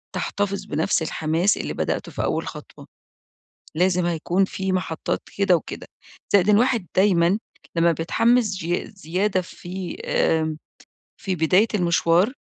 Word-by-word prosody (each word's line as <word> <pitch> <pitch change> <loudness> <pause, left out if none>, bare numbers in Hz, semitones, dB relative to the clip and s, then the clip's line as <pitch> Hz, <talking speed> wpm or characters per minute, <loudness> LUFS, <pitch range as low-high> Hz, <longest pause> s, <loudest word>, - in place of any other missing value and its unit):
تحتفظ 200 -1 -2
بنَفس 160 +4 0
الحماس 160 +4 +1
اللي - - -4
بدأته - - -2
في - - -3
أول - - -1
خطوة. - - -10 0.9
لازم 180 +1 +2
هيكون 175 +3 +1
في 190 0 -3
محطات 180 -3 -2 0.2
كده 195 -3 +4
وكده، 165 - -6 0.5
زائد 200 0 +5
إن 210 - +6
الواحد 235 -4 +2
دايمًا 185 0 +3 0.4
لما 170 0 +4
بيتحمس 215 +6 +2
چيا 175 +1 -2
زيادة 185 +2 0
في 180 +1 -7
آمم 160 -1 +1 0.6
في 190 -2 -2
بداية 180 +6 +3
المشوار 175 +3 +2
180 Hz, 130 wpm, -23 LUFS, 170-200 Hz, 0.9 s, إن